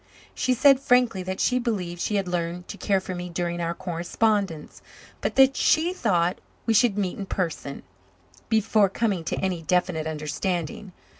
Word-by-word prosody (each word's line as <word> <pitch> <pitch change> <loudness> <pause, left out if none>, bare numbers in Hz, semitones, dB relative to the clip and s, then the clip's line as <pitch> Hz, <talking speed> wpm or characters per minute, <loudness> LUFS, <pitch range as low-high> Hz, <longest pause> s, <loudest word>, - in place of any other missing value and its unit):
She 250 - +1
said 275 +1 +6
frankly 250 -7 +3
that 185 +1 -4
she 250 0 +2
believed 185 -8 -3
she 210 - -1
had 195 -2 0
learned 175 0 -3
to 205 - -6
care 195 -2 +2
for 185 0 -6
me 180 0 -5
during 175 0 -2
our 170 0 -2
correspondence, 180 0 -1 0.4
but - - -2
that 270 0 +6
she 330 +3 +2
thought 180 - 0 0.2
we 225 - +2
should 225 -2 +3
meet 190 -2 -2
in 195 - -5
person, 165 -7 -3 0.7
before 215 -2 +3
coming 200 -4 -1
to - - -1
any 185 -3 -1
definite 170 -1 0
understanding. 160 +4 -3
185 Hz, 165 wpm, -25 LUFS, 175-220 Hz, 0.7 s, said